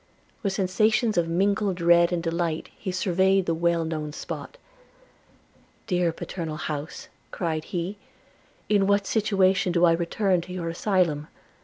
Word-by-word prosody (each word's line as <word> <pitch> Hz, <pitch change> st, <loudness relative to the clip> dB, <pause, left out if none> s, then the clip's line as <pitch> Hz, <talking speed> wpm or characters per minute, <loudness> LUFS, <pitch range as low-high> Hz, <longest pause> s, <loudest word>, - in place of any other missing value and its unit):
With 200 Hz, -, 0 dB
sensations 215 Hz, +4 st, +2 dB
of 170 Hz, -1 st, +2 dB
mingled 195 Hz, +3 st, +1 dB
dread 170 Hz, 0 st, +4 dB
and 170 Hz, -1 st, -1 dB
delight 165 Hz, -1 st, -2 dB
he 190 Hz, -, -5 dB
surveyed 190 Hz, +1 st, +2 dB
the 165 Hz, -, 0 dB
well 170 Hz, 0 st, +1 dB
known 155 Hz, -2 st, -4 dB
spot. -, -, -7 dB, 1.3 s
'Dear 180 Hz, -3 st, +1 dB
paternal 160 Hz, -2 st, -5 dB
house,' 150 Hz, 0 st, -5 dB, 0.2 s
cried 160 Hz, -3 st, -3 dB
he, 180 Hz, +3 st, -4 dB, 0.7 s
'in 200 Hz, -2 st, +3 dB
what 200 Hz, 0 st, +2 dB
situation 195 Hz, -4 st, +2 dB
do 170 Hz, 0 st, +4 dB
I 170 Hz, -, +5 dB
return 175 Hz, +2 st, +1 dB
to 180 Hz, +2 st, -9 dB
your 170 Hz, -2 st, -3 dB
asylum! 165 Hz, -4 st, 0 dB
175 Hz, 140 wpm, -25 LUFS, 165-195 Hz, 1.3 s, I